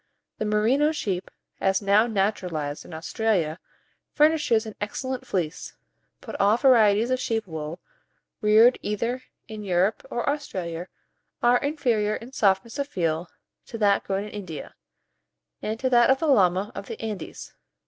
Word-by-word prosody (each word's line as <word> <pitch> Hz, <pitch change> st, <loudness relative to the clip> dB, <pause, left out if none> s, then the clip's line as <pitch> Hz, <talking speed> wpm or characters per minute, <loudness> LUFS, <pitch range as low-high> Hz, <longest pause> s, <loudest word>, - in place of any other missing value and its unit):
The 215 Hz, -, -1 dB
Merino 230 Hz, +9 st, +2 dB
sheep, 195 Hz, -, -3 dB, 0.3 s
as 195 Hz, 0 st, +2 dB
now 205 Hz, +3 st, +3 dB
naturalized 180 Hz, -9 st, -2 dB
in -, -, -12 dB
Australia, 165 Hz, 0 st, -1 dB, 0.6 s
furnishes 295 Hz, -7 st, +3 dB
an 220 Hz, -, -7 dB
excellent 260 Hz, +5 st, -4 dB
fleece; 170 Hz, -5 st, -3 dB, 0.5 s
but -, -, -8 dB
all 205 Hz, +3 st, +4 dB
varieties 230 Hz, -3 st, +4 dB
of 255 Hz, -, +1 dB
sheep 225 Hz, -3 st, -1 dB
wool, 160 Hz, -1 st, -6 dB, 0.6 s
reared 220 Hz, +3 st, +5 dB
either 230 Hz, +5 st, -2 dB, 0.3 s
in 215 Hz, -2 st, -7 dB
Europe 190 Hz, +2 st, +1 dB
or 240 Hz, -, -3 dB
Australia 185 Hz, -, -3 dB, 0.6 s
are 240 Hz, +1 st, +5 dB
inferior 235 Hz, -8 st, 0 dB
in 235 Hz, +4 st, -9 dB
softness 215 Hz, +1 st, +1 dB
of 280 Hz, -, -1 dB
feel 170 Hz, -, -2 dB, 0.4 s
to 230 Hz, -, -6 dB
that 205 Hz, -2 st, +3 dB
grown 195 Hz, 0 st, -2 dB
in 210 Hz, -, -8 dB
India, 185 Hz, -7 st, -7 dB, 0.9 s
and 220 Hz, +1 st, -3 dB
to 260 Hz, -, 0 dB
that 240 Hz, 0 st, +5 dB
of 265 Hz, -, +5 dB
the 320 Hz, -, -2 dB
llama 195 Hz, -, +3 dB
of 200 Hz, -, -7 dB
the -, -, -7 dB
Andes. 215 Hz, -6 st, -6 dB
210 Hz, 150 wpm, -25 LUFS, 190-240 Hz, 0.9 s, reared